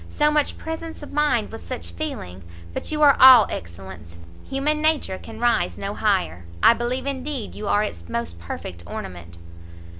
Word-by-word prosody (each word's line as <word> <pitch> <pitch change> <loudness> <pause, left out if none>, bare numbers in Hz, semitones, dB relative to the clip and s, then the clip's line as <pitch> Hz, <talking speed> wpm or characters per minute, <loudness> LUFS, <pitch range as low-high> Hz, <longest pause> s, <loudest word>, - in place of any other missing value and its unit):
so 300 0 +2
much 300 -1 0
presence 320 -1 -6
of - - -10
mind 295 -7 +1
with - - -8
such 85 0 -6
feeling! 90 +2 -5 0.3
but - - -3
you 305 0 +1
are 285 -2 +7
all 255 -4 +10
excellence! 85 -1 -8 0.3
human 295 +3 -1
nature 310 -12 +1
can 220 0 -10
rise 235 - +1
no - - -4
higher! 85 +3 0 0.2
I - - +8
believe 240 +3 -2
indeed 275 -3 -4
you 210 - -6
are 205 +1 +3
its 85 - -6
most 85 -8 -4
perfect 85 0 -7
ornament!" 85 -2 -8
220 Hz, 170 wpm, -23 LUFS, -, 0.3 s, all